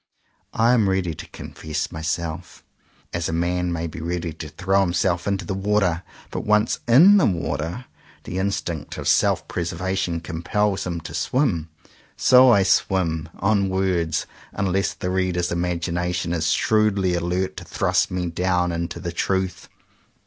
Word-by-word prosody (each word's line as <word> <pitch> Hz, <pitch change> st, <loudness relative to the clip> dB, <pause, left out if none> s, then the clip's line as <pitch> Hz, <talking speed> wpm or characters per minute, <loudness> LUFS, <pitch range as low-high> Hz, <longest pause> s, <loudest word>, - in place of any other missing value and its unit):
I 115 Hz, +2 st, +4 dB
am 110 Hz, -5 st, +3 dB
ready 95 Hz, -3 st, 0 dB
to 85 Hz, +2 st, -9 dB
confess 80 Hz, -1 st, -5 dB
my 80 Hz, -, -6 dB
self, 80 Hz, +2 st, -4 dB, 0.5 s
as 85 Hz, -1 st, -1 dB
a -, -, -2 dB
man 90 Hz, +1 st, 0 dB
may 85 Hz, 0 st, -2 dB
be 80 Hz, 0 st, -6 dB
ready 85 Hz, 0 st, -3 dB
to 80 Hz, 0 st, -8 dB
throw 95 Hz, +6 st, +1 dB
him 90 Hz, -3 st, 0 dB
self 85 Hz, 0 st, 0 dB
into 100 Hz, -2 st, -1 dB
the 95 Hz, -, -3 dB
water. 95 Hz, -3 st, +1 dB, 0.3 s
But -, -, -3 dB
once 105 Hz, +1 st, +2 dB
in 170 Hz, -, +8 dB
the 195 Hz, -, +4 dB
water, 85 Hz, -, -2 dB, 0.4 s
the 90 Hz, -, -4 dB
instinct 90 Hz, -6 st, -3 dB
of -, -, -4 dB
self -, -, +3 dB
preservation 90 Hz, 0 st, -2 dB
compels 90 Hz, +5 st, -1 dB
him 85 Hz, -2 st, -3 dB
to -, -, -8 dB
swim. 105 Hz, -, 0 dB, 0.5 s
So 130 Hz, 0 st, +7 dB
I 100 Hz, -5 st, +5 dB
swim 85 Hz, -4 st, +1 dB
— -, -, -23 dB
on 100 Hz, -1 st, +1 dB
words 90 Hz, -4 st, 0 dB, 0.2 s
— -, -, -23 dB
unless 95 Hz, 0 st, 0 dB
the 90 Hz, -2 st, -3 dB
reader's 90 Hz, -2 st, 0 dB
imagination 85 Hz, 0 st, -1 dB
is 85 Hz, -1 st, 0 dB
shrewdly 100 Hz, -4 st, +2 dB
alert 90 Hz, +2 st, -1 dB
to -, -, -6 dB
thrust -, -, +1 dB
me 90 Hz, -1 st, -2 dB
down 90 Hz, +1 st, 0 dB
into 85 Hz, 0 st, -3 dB
the 85 Hz, -1 st, -4 dB
truth. 95 Hz, +1 st, -2 dB
90 Hz, 165 wpm, -23 LUFS, 85-95 Hz, 0.5 s, in